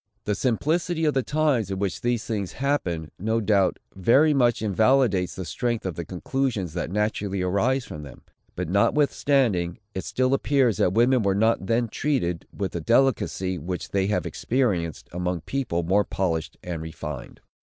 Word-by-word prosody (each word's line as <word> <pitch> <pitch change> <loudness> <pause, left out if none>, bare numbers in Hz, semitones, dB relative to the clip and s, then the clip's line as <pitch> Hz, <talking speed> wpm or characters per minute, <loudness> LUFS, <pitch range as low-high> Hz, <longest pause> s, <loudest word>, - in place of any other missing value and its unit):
The 105 - 0
simplicity 160 - 0
of 150 - +2
the 135 - +2
times 145 - +1
in 95 - -2
which 95 -1 -2
these 120 -2 0
things 100 -5 -3
happened, 90 - -1
no 110 +4 0
doubt, 100 -3 +2 0.2
very 135 - +4
much 120 -5 +2
invalidates 110 -2 +2
the 95 - -5
strength 120 +6 -2
of 95 - -2
the 85 - -5
conclusions 95 - -2
that 90 - -3
naturally 100 -1 -1
arise 120 +8 +1
from 75 - -8
them. 70 -3 -12 0.3
But, 90 -1 -3
notwithstanding, 105 - +2 0.2
it 95 - -4
still 130 +1 0
appears 135 -5 +2
that 90 - +2
women 120 +3 +4
were 100 -2 +1
not 110 -2 +2
then 115 +1 +2
treated 110 - -1
with 100 -2 -3
the 85 - -4
delicacy 105 -5 +1
which 90 +4 -5
they 95 -1 +1
have 105 - 0
experienced 100 - -1
among 90 -1 -2
people 115 - -2
more 95 +5 +3
polished 85 -6 -2
and 85 -3 -4
refined. 75 -4 -7
105 Hz, 165 wpm, -25 LUFS, 90-130 Hz, 0.3 s, very